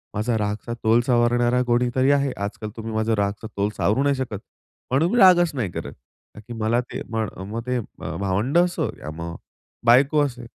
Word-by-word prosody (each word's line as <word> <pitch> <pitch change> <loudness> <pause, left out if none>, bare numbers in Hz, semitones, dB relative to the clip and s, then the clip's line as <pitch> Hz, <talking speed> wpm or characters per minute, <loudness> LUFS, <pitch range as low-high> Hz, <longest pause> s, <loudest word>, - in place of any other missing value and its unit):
माझा 110 +2 0
रागचा 105 +2 -3
तोल 115 +2 +4
सावरणारा 120 0 +3
कोणीतरी 125 +2 +2
आहे. 140 -1 +2
आजकाल 105 +1 -5
तुम्ही 110 0 -5
माझा 110 +1 +1
रागचा 100 +2 -2
तोल 100 +1 +1
सावरू 110 +7 +2
नाही 140 0 +2
शकत, 130 -6 -4 0.5
म्हणून 155 +7 +2
मी - - +2
रागच 175 -4 +6
नाही 115 -9 -2
करत. - - -6
कारण 65 +10 -19
की 120 - -7
मला 110 +2 +1
ते 125 - -7
मग 110 -1 -1 0.2
मग 115 +1 -3
ते 125 0 0
म 110 - -8
भावंडं 105 - +2
असो 175 - -2
या 75 - -7
मग 85 +1 -6 0.5
बायको 135 +5 +5
असो. 125 -3 -6
120 Hz, 190 wpm, -23 LUFS, 105-130 Hz, 0.5 s, रागच